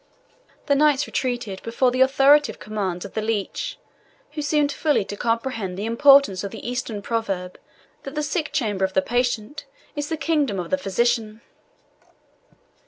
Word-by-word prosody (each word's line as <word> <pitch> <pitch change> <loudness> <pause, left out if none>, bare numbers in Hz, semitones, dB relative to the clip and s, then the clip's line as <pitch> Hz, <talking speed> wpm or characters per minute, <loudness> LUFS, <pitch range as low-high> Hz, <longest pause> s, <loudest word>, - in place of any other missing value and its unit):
The 285 - +2
knights 290 -1 +3
retreated 240 -7 -3
before 240 +2 +1
the 255 +1 0
authoritative 275 +3 +5
commands 195 -4 -4
of 200 - -10
the 220 - -2
leech, 225 - -3 0.5
who 300 0 -4
seemed 290 0 +1
fully 295 -8 +1
to 205 - -6
comprehend 230 -4 -2
the 205 - -3
importance 235 -4 +5
of 200 - -3
the - - -8
Eastern 245 -4 -4
proverb 195 -6 -3 0.4
that 275 +2 -8
the 300 - -1
sick 310 +1 -2
chamber 210 -9 -1
of 190 0 0
the 190 - +3
patient 245 +3 -1 0.3
is 290 0 -3
the 320 - -2
kingdom 295 - 0
of 175 - -5
the 280 - +3
physician. 225 0 0
240 Hz, 160 wpm, -23 LUFS, 205-285 Hz, 0.5 s, authoritative